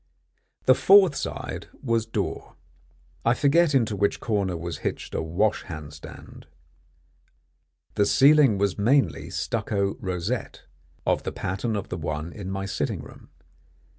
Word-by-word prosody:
The 130 - +7
fourth 190 +1 +6
side - - -5 0.2
was 115 -3 0
door. - - -4 0.7
I 115 +2 +3
forget 150 +2 +3
into 115 -5 +2
which 100 +1 0
corner 100 -6 -1
was 85 0 -5
hitched - - -4
a - - -1
wash 90 +7 0
hand 75 -4 -8
stand. 75 - -12 1.5
The 100 - +2
ceiling 140 -5 +5
was 100 0 0
mainly 105 - +2
stucco 100 -2 -2
rosette, 95 +3 -4 0.4
of - - +1
the - - -4
pattern 100 +5 -3
of 100 - -4
the 90 - -4
one 80 0 -4
in 100 -3 -7
my 95 0 -3
sitting 100 - -2
room. - - -14
100 Hz, 135 wpm, -25 LUFS, 90-125 Hz, 1.5 s, The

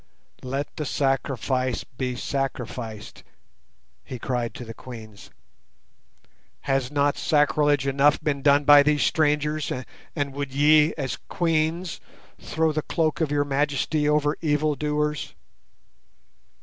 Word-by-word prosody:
"Let 135 +3 -4
the 150 - -3
sacrifice 130 -2 -1
be 125 0 -4
sacrificed," 125 -5 -5 0.8
he 130 - -7
cried 120 -1 -3
to 125 - -7
the 115 - -8
Queens. 110 -4 -11 1.3
"Has 135 -2 0
not 145 0 +1
sacrilege 145 -2 +2
enough 140 +2 +3
been 140 -2 -2
done 145 +1 +4
by 145 0 +8
these 150 0 +2
strangers, 150 -1 +1 0.4
and 145 -3 -2
would 140 -1 -5
ye, 150 +2 +5
as 130 -7 -3
Queens, 165 +1 -1 0.4
throw 160 0 0
the 155 0 -1
cloak 160 0 -1
of 160 - +1
your 145 0 +1
majesty 145 +1 0
over 150 0 +1
evildoers? 150 -1 -1
145 Hz, 115 wpm, -24 LUFS, 130-150 Hz, 1.3 s, by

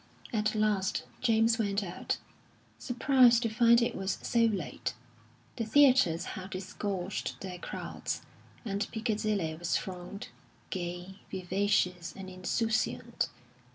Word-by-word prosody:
At 215 0 +1
last 210 -3 +1 0.2
James 225 0 +3
went 200 -1 +1
out, 175 -2 -3 0.6
surprised 245 -1 +5
to 230 - +1
find 235 +2 +5
it - - 0
was 190 0 -2
so 230 -1 +3
late. 200 -7 -2 0.6
The 230 - 0
theatres 240 - +5
had 190 0 -7
disgorged 190 0 -3
their 185 -2 -6
crowds, - - -4 0.4
and 200 -1 -1
Piccadilly 215 -6 0
was 165 0 0
thronged, 185 +4 -6 0.4
gay, 180 +1 -4
vivacious, 185 -1 0
and 190 -1 -7
insouciant. 225 +5 0
205 Hz, 115 wpm, -31 LUFS, 185-225 Hz, 0.6 s, surprised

